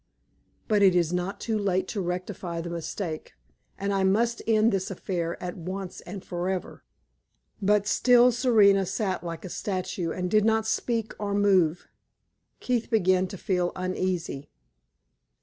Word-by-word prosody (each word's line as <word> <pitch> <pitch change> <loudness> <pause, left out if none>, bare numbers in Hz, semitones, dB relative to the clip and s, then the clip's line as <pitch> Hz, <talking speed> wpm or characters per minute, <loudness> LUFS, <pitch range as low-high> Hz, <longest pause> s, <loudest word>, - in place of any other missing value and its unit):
But 210 -2 +2
it 190 -2 +6
is 175 -1 +2
not 185 +3 -2
too 220 -2 -1
late 190 -2 0
to 205 - -2
rectify 180 -1 -4
the 170 +1 -5
mistake, 165 - -5 0.4
and 200 +1 -1
I 195 -1 +1
must 230 +5 +2
end 220 0 +4
this 190 -2 -1
affair 175 -3 -3
at 180 -1 -4
once 185 +1 -6
and 190 +1 -7
forever." 180 +1 -4 0.8
But 205 +1 +3
still 245 +3 +5
Serena 210 -6 +4
sat 190 -2 -2
like 170 +1 -6
a - - -6
statue 185 -3 -3
and 180 +2 -3
did 215 -1 +4
not 220 0 +2
speak 225 0 -1
or 200 -1 -2
move. 185 -5 +2 0.7
Keith 245 -2 -1
began 185 -4 +3
to 195 - -8
feel 180 -1 0
uneasy. 185 -5 -3
190 Hz, 150 wpm, -27 LUFS, 180-210 Hz, 0.8 s, it